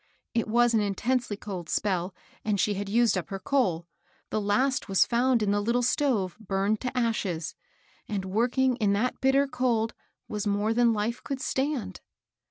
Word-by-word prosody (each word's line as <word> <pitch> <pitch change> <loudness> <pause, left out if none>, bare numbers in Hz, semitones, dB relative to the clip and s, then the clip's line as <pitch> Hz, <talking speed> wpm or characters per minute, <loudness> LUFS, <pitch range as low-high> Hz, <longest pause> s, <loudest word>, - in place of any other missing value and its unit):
It 230 - 0
was 240 +2 +3
an 225 - +4
intensely 210 +2 -1
cold 185 -6 -6
spell, 185 -2 -1 0.3
and 210 -2 0
she 210 - +2
had 200 0 -4
used 230 +1 +3
up 185 - -3
her 195 - -3
coal, 185 -7 0 0.2
— - - -37
the 215 - 0
last 255 +6 +1
was 195 - +4
found 240 -1 +2
in 200 - +1
the 205 0 +1
little 235 +4 +1
stove, 235 - +1
burned 200 +1 0
to 250 0 -3
ashes, 200 -9 -1 0.3
— - - -34
and 200 -3 -2
working 240 +6 +1
in 210 -4 +2
that 230 +5 -1
bitter 270 +1 +4
cold 235 -4 0 0.3
was 210 0 -3
more 205 +2 +1
than 240 0 +4
life 220 +2 -2
could 275 -1 -4
stand. 265 -9 -2
220 Hz, 180 wpm, -27 LUFS, 200-245 Hz, 0.3 s, an